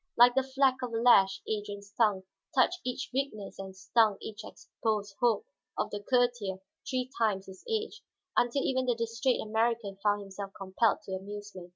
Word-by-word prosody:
Like 245 Hz, +1 st, +8 dB
the 265 Hz, -, +3 dB
fleck 265 Hz, 0 st, +2 dB
of 250 Hz, -2 st, -4 dB
a -, -, 0 dB
lash 195 Hz, -5 st, +5 dB
Adrian's 205 Hz, -2 st, -4 dB
tongue 210 Hz, -4 st, +2 dB, 0.3 s
touched 310 Hz, +8 st, +3 dB
each 250 Hz, +1 st, -4 dB
weakness 255 Hz, -9 st, -3 dB
and 190 Hz, -1 st, -8 dB
stung 205 Hz, +2 st, +3 dB
each 215 Hz, 0 st, -8 dB
exposed 215 Hz, -2 st, -3 dB
hope 240 Hz, -, +2 dB, 0.3 s
of -, -, -1 dB
the 205 Hz, -, -3 dB
courtier 245 Hz, -5 st, +1 dB, 0.3 s
three 255 Hz, -1 st, -1 dB
times 205 Hz, -4 st, +1 dB
his 190 Hz, -1 st, -12 dB
age, 445 Hz, 0 st, -2 dB, 0.3 s
until 245 Hz, +3 st, +2 dB
even 260 Hz, -1 st, 0 dB
the 245 Hz, -, +3 dB
distrait 230 Hz, +2 st, 0 dB
American 220 Hz, -2 st, 0 dB
found 205 Hz, -1 st, +2 dB
himself 195 Hz, 0 st, -7 dB
compelled 195 Hz, +4 st, +1 dB
to -, -, -9 dB
amusement. 195 Hz, -1 st, -7 dB
220 Hz, 170 wpm, -30 LUFS, 200-245 Hz, 0.3 s, Like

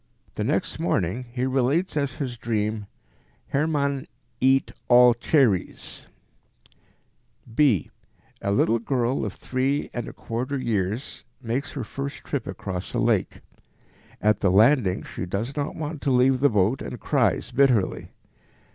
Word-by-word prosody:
The -, -, -3 dB
next -, -, -1 dB
morning 100 Hz, +9 st, -1 dB
he 125 Hz, +1 st, -1 dB
relates 135 Hz, +8 st, +1 dB
as 140 Hz, -3 st, 0 dB
his 130 Hz, -3 st, -4 dB
dream, 110 Hz, -2 st, -2 dB, 0.6 s
"Hermann 140 Hz, -2 st, 0 dB, 0.3 s
eat 135 Hz, +1 st, +3 dB, 0.2 s
all 125 Hz, 0 st, +7 dB
cherries." 120 Hz, -, 0 dB, 1.5 s
b). 130 Hz, -, +3 dB, 0.5 s
A 100 Hz, -, -1 dB
little 110 Hz, +3 st, +3 dB
girl 125 Hz, +1 st, 0 dB
of -, -, -3 dB
three 135 Hz, +3 st, -1 dB
and 120 Hz, -2 st, -4 dB
a -, -, -8 dB
quarter 125 Hz, +5 st, -3 dB
years 110 Hz, -1 st, -2 dB, 0.2 s
makes 130 Hz, +4 st, -3 dB
her 135 Hz, -, -4 dB
first 140 Hz, +5 st, -6 dB
trip 140 Hz, -6 st, -3 dB
across 95 Hz, -1 st, -5 dB
a -, -, +1 dB
lake. -, -, +1 dB, 0.8 s
At 105 Hz, 0 st, +2 dB
the 100 Hz, -, +2 dB
landing 105 Hz, 0 st, +4 dB
she 90 Hz, -, -6 dB
does 110 Hz, +9 st, -3 dB
not 145 Hz, -1 st, -2 dB
want 155 Hz, -1 st, -5 dB
to -, -, 0 dB
leave 130 Hz, 0 st, +4 dB
the 145 Hz, +2 st, +4 dB
boat 105 Hz, +4 st, +1 dB
and -, -, -6 dB
cries -, -, +1 dB
bitterly. 125 Hz, -8 st, +2 dB
125 Hz, 140 wpm, -25 LUFS, 110-140 Hz, 1.5 s, all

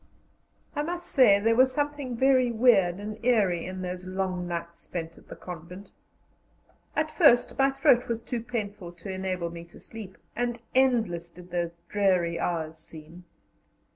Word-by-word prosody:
I 295 Hz, -, 0 dB
must 350 Hz, +3 st, -4 dB
say 215 Hz, -7 st, +6 dB
there 225 Hz, +2 st, +2 dB
was 260 Hz, +2 st, +5 dB
something 290 Hz, -3 st, -2 dB
very 260 Hz, -1 st, +4 dB
weird 220 Hz, -7 st, +4 dB
and 215 Hz, +2 st, -7 dB
eerie 200 Hz, -9 st, +2 dB
in 185 Hz, 0 st, -5 dB
those 180 Hz, 0 st, -5 dB
long 185 Hz, -1 st, -3 dB
nights 170 Hz, -1 st, -5 dB
spent 165 Hz, -2 st, -6 dB
at -, -, -19 dB
the -, -, -9 dB
convent. 180 Hz, +3 st, -9 dB, 1.0 s
At 310 Hz, 0 st, 0 dB
first 285 Hz, -10 st, +4 dB
my 270 Hz, 0 st, +5 dB
throat 270 Hz, -2 st, +3 dB
was 230 Hz, -1 st, -3 dB
too 235 Hz, -1 st, -3 dB
painful 210 Hz, -6 st, -5 dB
to 175 Hz, +3 st, -8 dB
enable 185 Hz, -2 st, -3 dB
me 170 Hz, 0 st, -8 dB
to 170 Hz, -, -16 dB
sleep, 210 Hz, -4 st, -10 dB, 0.2 s
and 240 Hz, -1 st, -1 dB
endless 225 Hz, -10 st, +2 dB
did 180 Hz, +1 st, -15 dB
those 170 Hz, -1 st, -2 dB
dreary 180 Hz, -5 st, +1 dB
hours 160 Hz, -2 st, -2 dB
seem. 165 Hz, +3 st, -12 dB
195 Hz, 160 wpm, -27 LUFS, 175-245 Hz, 1.0 s, say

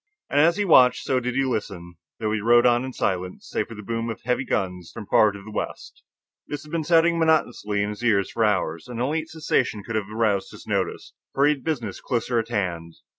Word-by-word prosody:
And 145 Hz, -, +3 dB
as 170 Hz, +3 st, +4 dB
he 205 Hz, -, +1 dB
watched, 125 Hz, -8 st, +5 dB
so 130 Hz, -, +1 dB
did 125 Hz, 0 st, -3 dB
he 135 Hz, 0 st, +2 dB
listen, 100 Hz, -8 st, -4 dB, 0.3 s
though 110 Hz, -2 st, -1 dB
he 105 Hz, -1 st, -1 dB
rode 120 Hz, +2 st, +5 dB
on 120 Hz, 0 st, +4 dB
in 130 Hz, -, -5 dB
silence, 90 Hz, -6 st, -3 dB
save -, -, -2 dB
for 115 Hz, -, -9 dB
the 105 Hz, -, -9 dB
boom 115 Hz, +2 st, -3 dB
of 115 Hz, -, -6 dB
heavy 125 Hz, +2 st, 0 dB
guns 90 Hz, -6 st, -2 dB
from 105 Hz, -, -8 dB
far 105 Hz, +1 st, +4 dB
to 100 Hz, -1 st, -10 dB
the 110 Hz, -, -10 dB
west. -, -, -6 dB, 0.5 s
This 145 Hz, -1 st, -5 dB
had 150 Hz, -, -14 dB
been 165 Hz, -1 st, -1 dB
sounding 165 Hz, +1 st, +3 dB
monotonously 120 Hz, -10 st, +1 dB
in 105 Hz, -, -2 dB
his 105 Hz, +3 st, -7 dB
ears 100 Hz, -5 st, +2 dB
for 115 Hz, -, 0 dB
hours, 95 Hz, -3 st, 0 dB
and 120 Hz, -2 st, -6 dB
only 145 Hz, +6 st, 0 dB
its 160 Hz, 0 st, -9 dB
cessation 125 Hz, -9 st, 0 dB
could 115 Hz, +1 st, -5 dB
have 105 Hz, -2 st, -2 dB
aroused 110 Hz, -3 st, 0 dB
his -, -, -12 dB
notice. -, -, -2 dB, 0.2 s
For 140 Hz, -, +4 dB
he 150 Hz, -, +5 dB
had 135 Hz, -3 st, -11 dB
business 120 Hz, -, -3 dB
closer 120 Hz, -1 st, 0 dB
to 115 Hz, +1 st, -12 dB
hand. 85 Hz, -6 st, -3 dB
115 Hz, 235 wpm, -24 LUFS, 105-135 Hz, 0.5 s, watched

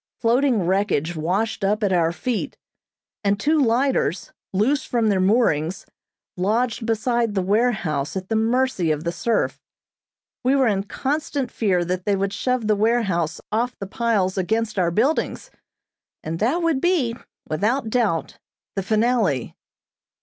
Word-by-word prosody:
Floating 240 Hz, -3 st, +2 dB
wreckage 180 Hz, -3 st, 0 dB
washed 195 Hz, +7 st, -1 dB
up 210 Hz, +3 st, +1 dB
at 195 Hz, -2 st, +2 dB
our 165 Hz, -2 st, +2 dB
feet, 235 Hz, +6 st, -3 dB, 0.7 s
and 200 Hz, 0 st, +1 dB
two 310 Hz, +5 st, +2 dB
lighters, 245 Hz, -, +1 dB, 0.2 s
loose 250 Hz, +9 st, +1 dB
from 230 Hz, -3 st, 0 dB
their 195 Hz, -2 st, +2 dB
moorings, 185 Hz, -5 st, +1 dB, 0.5 s
lodged 225 Hz, +5 st, 0 dB
beside 230 Hz, 0 st, 0 dB
the 190 Hz, -, +2 dB
warehouse 195 Hz, -, 0 dB
at 185 Hz, -1 st, -5 dB
the 225 Hz, -, -1 dB
mercy 225 Hz, -5 st, +1 dB
of 155 Hz, 0 st, -1 dB
the 170 Hz, -, -1 dB
surf. 220 Hz, +6 st, -1 dB, 0.8 s
We 260 Hz, +2 st, +3 dB
were 270 Hz, -1 st, +3 dB
in 200 Hz, -4 st, +1 dB
constant 280 Hz, +1 st, -2 dB
fear 185 Hz, -6 st, +1 dB
that 180 Hz, +1 st, -3 dB
they 205 Hz, -, +2 dB
would 195 Hz, 0 st, -1 dB
shove 250 Hz, +2 st, -1 dB
the 215 Hz, 0 st, +3 dB
warehouse 200 Hz, -7 st, +1 dB
off 240 Hz, +3 st, -1 dB
the 195 Hz, -, -5 dB
piles 200 Hz, -3 st, 0 dB
against 220 Hz, +2 st, -1 dB
our 175 Hz, -2 st, +2 dB
buildings, 275 Hz, -, 0 dB, 0.7 s
and 165 Hz, +1 st, -4 dB
that 280 Hz, +11 st, +1 dB
would 320 Hz, -5 st, +1 dB
be, 315 Hz, -11 st, +1 dB, 0.3 s
without 220 Hz, -, 0 dB
doubt, 215 Hz, -10 st, 0 dB, 0.4 s
the 195 Hz, -, 0 dB
finale. 215 Hz, -, +1 dB
215 Hz, 145 wpm, -22 LUFS, 185-245 Hz, 0.8 s, We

